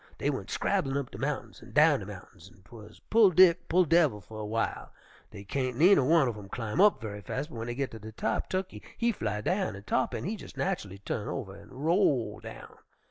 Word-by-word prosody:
Dey - - 0
went - - -5
scrabblin' 135 0 0
up 140 -3 -4
de - - -9
mountains - - -4
an' - - -14
down - - +5
de - - -8
mountains, 85 - -12
an' 95 - -22
'twuz 110 0 -14
pull 220 -2 +7
Dick, 180 -1 +5
pull 180 +2 +4
devil, 155 -9 +3
fer 110 +3 -12
a 105 -1 -5
w'ile. 115 +1 -2 0.4
Dey 100 -2 -10
kain't 130 +3 -2
neener 175 -2 +6
one 155 0 +4
uv 120 - -2
'em 100 -1 -11
climb 115 - -2
up 205 -8 +5
ve'y 105 -1 -6
fas', 130 +9 -4
but - - -19
w'en 115 +1 -4
dey 120 - -4
git 135 0 -2
ter 110 - -9
de 110 +1 -9
top, 110 - -2
Tukkey 185 0 -3 0.2
he 235 0 +2
fly 105 - -3
down 185 - -1
an' 100 - -10
Tarr'pin 130 - -1
he 200 - -2
jes' - - -12
natchully 105 - -2
turn 105 - -3
over 100 -8 -5
an' 100 +1 -14
roll 145 - +1
down. - - -11
130 Hz, 230 wpm, -29 LUFS, 105-175 Hz, 0.4 s, pull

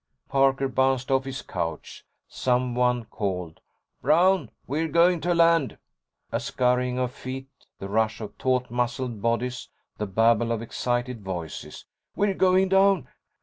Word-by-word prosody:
Parker 135 0 +2
bounced 130 0 +1
off 135 0 +2
his 135 0 -5
couch. 80 -2 -5 0.2
Someone 125 -1 0
called, 90 -7 -4 0.4
"Brown, 165 - +3 0.2
we're 155 +5 -1
going 170 +2 +3
to 175 0 +1
land!" 165 -4 +3 0.5
A - - 0
scurrying 125 0 0
of 125 -1 -1
feet, 130 +1 -7 0.3
the 100 - -6
rush 110 +2 0
of 105 -2 -7
taut 125 -2 0
muscled 120 -2 -2
bodies, 120 +2 -1 0.3
the 105 - -2
babble 115 +3 +3
of 115 - 0
excited 120 0 -2
voices. 90 -5 -6 0.3
"We're 200 -1 +1
going 190 0 +3
down!" 195 -7 +3
125 Hz, 135 wpm, -25 LUFS, 115-140 Hz, 0.5 s, Brown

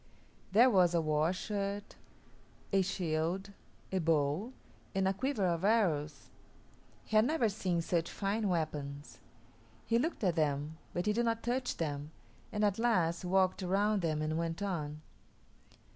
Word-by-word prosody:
There 240 +6 +6
was 180 -4 +4
a - - +4
war 155 +1 +1
shirt, 200 +1 -3 0.8
a 195 - +5
shield, 180 +1 -1 0.4
a 190 - +1
bow, 160 - +1 0.4
and 190 0 +2
a 190 - +2
quiver 250 -1 -1
of 170 -1 0
arrows. 165 -9 +1 0.7
He 220 - -4
had 215 +1 +6
never 270 -4 +2
seen 185 -4 -1
such 170 -1 0
fine 205 +1 -1
weapons. 145 -4 -3 0.7
He 230 0 +2
looked 320 -2 -2
at 180 -3 +3
them, 150 0 -1
but 175 - -2
he 210 - +2
did 235 +2 +1
not 230 0 0
touch 250 +2 -1
them, 145 -2 -3 0.4
and 210 0 +1
at 205 +1 +1
last 180 -8 +2
walked 185 +1 +2
around 200 +3 +1
them 155 -2 0
and 155 +1 -1
went 165 +2 -2
on. 155 -6 -3
185 Hz, 150 wpm, -33 LUFS, 160-210 Hz, 0.8 s, There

